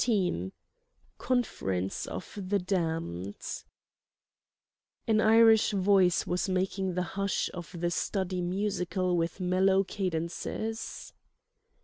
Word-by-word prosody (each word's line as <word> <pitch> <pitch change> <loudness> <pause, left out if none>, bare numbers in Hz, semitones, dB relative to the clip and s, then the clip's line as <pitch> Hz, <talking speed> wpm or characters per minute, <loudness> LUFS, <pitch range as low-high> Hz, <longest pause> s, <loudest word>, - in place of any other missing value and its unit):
XIV 180 - +1 0.7
CONFERENCE 95 - -1
OF 95 - -7
THE 205 +2 +2
DAMNED 165 - -3 1.4
An 220 -1 +4
Irish 220 -1 +6
voice 190 -2 +3
was 180 +2 -1
making 185 0 -1
the 180 - +1
hush 195 0 -1
of 175 -1 -8
the 175 0 0
study 185 0 -1
musical 185 -1 -1
with 170 +2 -1
mellow 190 +1 +3
cadences. 185 +4 -4
185 Hz, 95 wpm, -29 LUFS, 175-200 Hz, 1.4 s, Irish